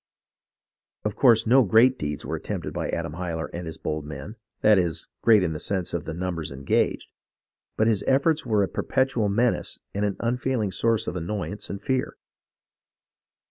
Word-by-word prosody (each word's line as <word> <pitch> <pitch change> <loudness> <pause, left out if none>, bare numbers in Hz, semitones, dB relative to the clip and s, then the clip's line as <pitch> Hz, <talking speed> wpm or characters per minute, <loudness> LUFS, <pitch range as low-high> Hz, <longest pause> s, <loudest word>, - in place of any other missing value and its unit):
Of 105 - -1
course 120 -4 +5
no 130 +3 +6
great 120 +5 +4
deeds 75 0 -3
were - - -2
attempted - - -5
by - - -3
Adam 75 - -3
Hyler 85 -1 -4
and 85 0 -5
his 80 - -7
bold 75 -1 -3
men, 75 - -8 0.3
that 105 -2 +6
is, 85 -2 -1 0.2
great 110 -4 +5
in 80 -3 -1
the 75 - -5
sense 95 0 -2
of 85 -3 -2
the 80 - -4
numbers 85 -4 -3
engaged, 70 0 0 0.7
but 110 - +3
his 110 -3 +2
efforts 150 +4 +3
were 110 -4 +2
a - - 0
perpetual 130 -4 0
menace 120 +4 +1 0.2
and 100 +2 -1
an 100 -2 -1
unfailing 120 -3 -1
source 115 +2 +1
of - - -3
annoyance 95 +2 -4
and 100 - -6
fear. 130 -1 -1
100 Hz, 175 wpm, -25 LUFS, 85-115 Hz, 0.7 s, no